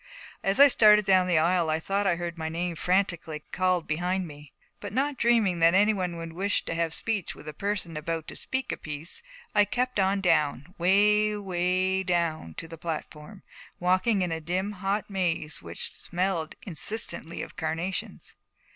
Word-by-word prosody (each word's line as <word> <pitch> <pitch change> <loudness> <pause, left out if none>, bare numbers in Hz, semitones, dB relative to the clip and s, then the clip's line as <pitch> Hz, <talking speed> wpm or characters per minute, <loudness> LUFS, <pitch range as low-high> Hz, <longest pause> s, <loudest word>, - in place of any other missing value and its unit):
As 195 +4 0
I 285 - +11
started 210 -5 +6
down 185 -1 +4
the 175 -3 +3
aisle 170 +1 +2
I 155 +1 +1
thought 195 +4 0
I 175 - +3
heard 170 0 -4
my 160 -1 -4
name 170 +1 -2
frantically 170 -4 0
called 185 -2 +1
behind 180 +3 -1
me; 150 -2 -12 0.3
but 205 - -6
not 280 +4 +1
dreaming 230 -8 +2
that 165 +2 +5
any 210 +3 +5
one 180 -3 -2
would 165 -1 -7
wish 200 +4 0
to - - -3
have 165 -1 -1
speech 215 -6 -1
with 150 - -13
a 155 - -5
person 195 -2 -3
about 160 +1 -3
to - - -8
speak 260 -1 -2
a - - -3
piece, 150 +2 -5 0.3
I 210 - +6
kept 250 +3 -1
on 195 +1 +2
down, 150 -3 +1
way, 210 +4 +4
way 185 0 0
down 170 - -1
to 165 - -6
the 165 -1 -10
platform, 165 +3 -6 0.4
walking 185 +3 +2
in 175 - -2
a 160 0 -3
dim 185 +5 -1
hot 200 +1 -2
maze 170 -6 -2
which - - -3
smelled 180 -3 -2
insistently 185 -1 -3
of - - -10
carnations. 165 +2 -3
180 Hz, 180 wpm, -27 LUFS, 165-200 Hz, 0.4 s, I